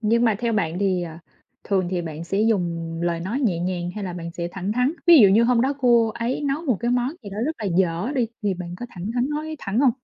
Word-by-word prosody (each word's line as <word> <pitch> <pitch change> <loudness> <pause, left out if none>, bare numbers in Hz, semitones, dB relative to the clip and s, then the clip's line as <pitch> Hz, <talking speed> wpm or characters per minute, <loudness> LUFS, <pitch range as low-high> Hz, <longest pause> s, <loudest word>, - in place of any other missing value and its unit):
Nhưng 230 +2 +2
mà 220 -3 +3
theo 235 -1 -1
bạn 175 -5 0
thì, 190 -3 +1
ờ, 165 -1 -7 0.5
thường 190 -3 0
thì 180 -2 -1
bạn 160 0 -6
sẽ 195 +4 -1
dùng 170 -6 0
lời 170 -1 0
nói 215 +10 -2
nhẹ 200 -11 +1
nhàng 175 0 -2
hay 210 -2 -4
là 180 - -4
bạn 170 -1 -6
sẽ 170 0 -4
thẳng 190 +1 -3
thắn, 250 +6 +1
ví 340 -2 +9
dụ 200 - +8
như 220 +4 +5
hôm 240 -1 +3
đó 265 +3 +2
cô 235 -3 +4
ấy 235 +5 -2
nấu 285 +3 -1
một 255 -8 +1
cái 240 - 0
món 245 0 +1
gì 200 - -8
đó 200 - -6
rất 315 - -1
là 220 - -5
dở 180 +8 0
đi 245 -4 +1
thì 200 -2 +1
bạn 175 -1 -7
có 245 - -4
thẳng 190 +2 -6
thắn 245 +1 +1
nói 310 +1 -3
thẳng 215 +2 -1
hông? 275 - +5
205 Hz, 275 wpm, -23 LUFS, 175-245 Hz, 0.5 s, ví